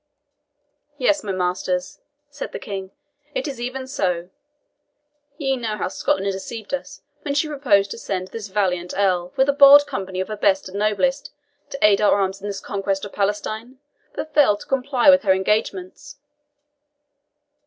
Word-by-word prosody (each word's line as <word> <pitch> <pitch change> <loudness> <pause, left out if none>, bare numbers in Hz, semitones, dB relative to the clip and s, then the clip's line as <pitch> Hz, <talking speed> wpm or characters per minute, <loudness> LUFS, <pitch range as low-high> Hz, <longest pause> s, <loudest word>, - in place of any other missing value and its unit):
"Yes, 305 - +1
my 205 - -3
masters," 180 0 -2 0.3
said 290 - -7
the - - -3
King, 195 -2 -6 0.5
"it - - -2
is 270 -4 -6
even 255 +2 -4
so. 180 -8 -2 1.1
Ye 270 -4 0
know 225 -4 -3
how 185 - -2
Scotland 195 +1 0
deceived 215 +5 -7
us 275 - -5 0.2
when 285 -1 -3
she 290 +2 +1
proposed 215 -10 +2
to - - -6
send 185 -3 -4
this 220 0 -7
valiant 185 -3 -1
Earl, 180 -3 +1
with 265 0 +3
a 280 - +3
bold 285 0 +8
company 190 -7 -5
of 185 - -2
her 215 - -3
best 195 -2 +2
and 190 +2 -6
noblest, 215 +7 0 0.4
to 275 -1 -6
aid 205 -1 +5
our 205 -1 +4
arms 190 0 -1
in 205 - -5
this 200 -1 -4
conquest 195 0 -3
of 205 - -10
Palestine, 215 +5 -2 0.4
but 310 - -5
failed 235 -9 +4
to - - -10
comply 270 +1 +3
with 275 0 +5
her 195 -3 +4
engagements. 200 +6 -2
210 Hz, 165 wpm, -22 LUFS, 190-270 Hz, 1.1 s, bold